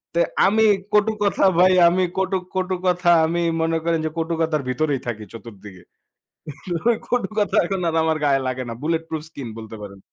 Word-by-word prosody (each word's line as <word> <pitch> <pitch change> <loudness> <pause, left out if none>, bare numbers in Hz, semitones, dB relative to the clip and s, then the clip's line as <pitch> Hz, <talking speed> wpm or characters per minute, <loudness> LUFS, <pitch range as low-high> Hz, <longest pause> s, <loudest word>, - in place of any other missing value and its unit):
তো - - +2 0.3
আমি 220 +3 +3 0.3
কটু 210 +1 +3
কথা 200 - +1 0.2
ভাই, 185 +1 +6
আমি 185 +2 +2
কটু 190 0 0 0.2
কটু 185 0 -1
কথা 180 -1 +2 0.2
আমি 170 +2 -1 0.2
মনে 165 0 +1
করেন 165 -1 0
যে, - - 0
কটু 165 +1 -1
কথার 160 -2 0
ভিতরেই 140 +1 0
থাকি 110 -2 -4
চতুর্দিকে। 105 -5 -12 1.2
কটু 245 -6 -1
কথা 205 -3 0
এখন 190 0 -3
আর 165 - -3
আমার 160 -1 +1
গায়ে 135 -2 +2
লাগে 130 0 -3
না। 115 - -4
bulletproof 160 0 -2
skin 140 -6 -8
বলতে 110 0 -9
পারেন। 100 -1 -10
165 Hz, 180 wpm, -21 LUFS, 130-185 Hz, 1.2 s, ভাই